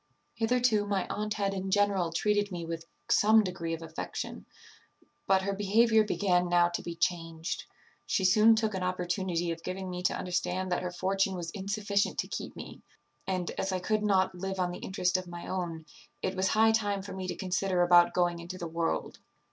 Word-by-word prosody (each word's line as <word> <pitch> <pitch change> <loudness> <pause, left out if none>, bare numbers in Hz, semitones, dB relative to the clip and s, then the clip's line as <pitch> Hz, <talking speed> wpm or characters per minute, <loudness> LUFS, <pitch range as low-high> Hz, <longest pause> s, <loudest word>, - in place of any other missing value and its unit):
"Hitherto 230 -2 +2
my 200 -2 0
aunt 210 +1 -2
had 200 -2 0
in 190 0 -3
general 195 -4 +2
treated 205 +3 +1
me 175 -2 -4
with 165 0 -5 0.2
some 220 -1 +5
degree 170 -3 -3
of 165 - -10
affection; 160 0 -6 0.8
but 190 -1 +4
her 200 +1 -1
behaviour 220 +3 +4
began 180 -4 +1
now 175 0 +4
to 175 - -3
be 170 - -6
changed. 165 -1 -2 0.4
She 190 - +1
soon 215 +4 +6
took 220 -1 0
an 190 - -3
opportunity 180 -1 -1
of 165 0 -5
giving 185 +1 -5
me 180 0 -4
to 180 - +1
understand 180 +1 -2
that - - +1
her 180 - -2
fortune 190 +2 0
was 170 -2 -5
insufficient 200 0 -1
to - - -1
keep - - -6
me; - - -9 0.5
and, 185 -2 -1
as 190 - -1
I 185 - 0
could 215 +4 0
not 190 -3 +2
live 190 +1 -4
on 180 -1 0
the 175 - -7
interest 185 -1 0
of 185 -1 -6
my 175 0 -8
own, 170 -4 -4 0.4
it 190 - -1
was 190 0 +1
high 220 +3 +4
time 205 -3 0
for 200 - -7
me 190 -1 -5
to 175 - -3
consider 185 0 0
about 175 0 +5
going 175 -1 +1
into 175 +2 -7
the 175 -2 -5
world. 165 0 -2
185 Hz, 195 wpm, -30 LUFS, 175-205 Hz, 0.8 s, soon